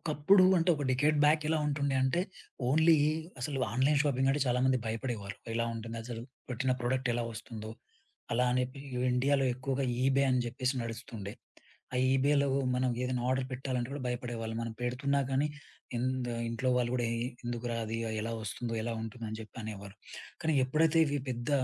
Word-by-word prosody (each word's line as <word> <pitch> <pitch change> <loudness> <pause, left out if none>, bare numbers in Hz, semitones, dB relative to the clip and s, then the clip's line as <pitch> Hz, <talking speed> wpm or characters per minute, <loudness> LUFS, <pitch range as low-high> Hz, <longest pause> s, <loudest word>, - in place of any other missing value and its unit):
ఒకప్పుడు 165 +5 +5
అంటే, 170 +2 +3
ఒక 145 - -3
డెకేడ్ 145 +4 +3
బ్యాక్ 155 +1 +5
ఎలా 160 -1 +2
ఉంటుండే 140 -1 0
అంటే, 130 +7 +2 0.5
ఓన్లీ 160 +3 +6 0.4
అసలు 135 +1 -2
ఆన్‌లైన్ 135 +4 +3
షాపింగంటే 135 0 +2
చాలామంది 130 +1 +3
భయపడేవారు. 110 -4 -3 0.2
ఎలా 115 0 +1
ఉంటుందసలు? 115 +1 -5 0.3
పెట్టిన 130 +1 +1
ప్రోడక్ట్ 130 +1 0
ఎలా 120 -1 0
వస్తుందో? 110 -1 -7 0.6
అలానే 125 +1 +2 0.5
ఇండియాలో 135 +2 +3
ఎక్కువగా 135 +1 -1 0.2
ఈబే 135 +1 +4
అని 125 -1 +3
చెప్పేసి 130 +2 -1
నడుస్తుండే. 115 -3 -6 0.6
ఆ - - +1 0.2
ఈబేలో 140 +1 +3 0.3
మనం 125 0 +1
ఏదైనా 125 -1 -1
ఆర్డర్ 130 0 +1
పెట్టాలంటే, 125 -2 -2
కూడా 140 -2 -4
భయపడేవాళ్ళు. 120 -2 -3
మనం 115 - -4
పెడుతున్నా 140 +3 +1
కానీ, 135 +3 +2 0.5
ఎందు 125 -1 -1 0.2
ఇంట్లో 115 +3 -1
వాళ్ళు 120 -1 +1
కూడా, 120 -2 +1 0.4
"ఎందుకురా 120 0 -2
అది? 110 +1 -3 0.2
ఎలా 115 +1 -3
వస్తుందో 115 +3 -4
ఎలా 115 0 -2
ఉంటుందో?" 115 +1 -6
అని 110 - -5
జెప్పి 110 +2 -10
అనేవారు. 100 -2 -7 0.5
కానీ 160 0 +2
ఎప్పుడైతే 160 +4 +3
ఇవి 145 0 0
పెద్ద 120 +2 -3
125 Hz, 155 wpm, -31 LUFS, 115-140 Hz, 0.6 s, ఓన్లీ